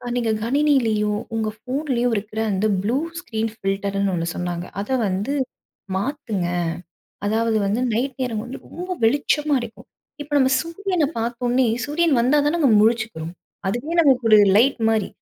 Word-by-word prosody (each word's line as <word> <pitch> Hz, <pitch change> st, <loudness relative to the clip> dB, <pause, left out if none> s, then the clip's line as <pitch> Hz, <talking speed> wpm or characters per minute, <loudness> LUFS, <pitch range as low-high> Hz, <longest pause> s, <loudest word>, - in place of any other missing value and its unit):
நீங்க 235 Hz, -2 st, +1 dB
கணினிலியும், 230 Hz, -6 st, +2 dB
உங்க 220 Hz, -1 st, 0 dB, 0.2 s
போன்லயும் 255 Hz, -3 st, 0 dB
இருக்கிற 215 Hz, +1 st, -4 dB
அந்த 195 Hz, +2 st, 0 dB, 0.2 s
ப்ளூ 230 Hz, +6 st, +1 dB, 0.2 s
ஸ்கிரீன் 225 Hz, -10 st, -3 dB
ஃபில்டர்னு 195 Hz, -1 st, -1 dB
ஒண்ணு 165 Hz, -1 st, -2 dB
சொன்னாங்க, 175 Hz, -1 st, -3 dB, 0.2 s
அத 205 Hz, -, -7 dB, 0.2 s
வந்து 200 Hz, +8 st, -1 dB, 0.6 s
மாத்துங்க. 215 Hz, -, -2 dB, 0.8 s
அதாவது 225 Hz, +1 st, +1 dB
வந்து 205 Hz, +5 st, 0 dB
நைட் 255 Hz, +3 st, -1 dB
நேரம் 225 Hz, -4 st, -2 dB
வந்து 250 Hz, +3 st, -7 dB
ரொம்ப 360 Hz, +2 st, -7 dB
வெளிச்சமா 290 Hz, +4 st, +2 dB
இருக்கும். 230 Hz, -2 st, -10 dB, 0.3 s
இப்ப 290 Hz, +1 st, -14 dB
நம்ம 265 Hz, -1 st, +3 dB
சூரியன 345 Hz, 0 st, -1 dB
பார்த்தவுன்னே, 240 Hz, +2 st, 0 dB, 0.2 s
சூரியன் 300 Hz, -2 st, +2 dB
வந்தா 260 Hz, +5 st, +3 dB
தானங்க 300 Hz, -1 st, +2 dB
முழிச்சுக்குவோம். 220 Hz, -7 st, 0 dB, 0.3 s
அதுவே 245 Hz, +11 st, -3 dB
நமக்கு 265 Hz, -6 st, +3 dB
ஒரு 215 Hz, -, +8 dB, 0.2 s
லைட் 250 Hz, +3 st, +3 dB
மாரி. 220 Hz, -3 st, +1 dB
235 Hz, 140 wpm, -22 LUFS, 210-280 Hz, 0.8 s, ஒரு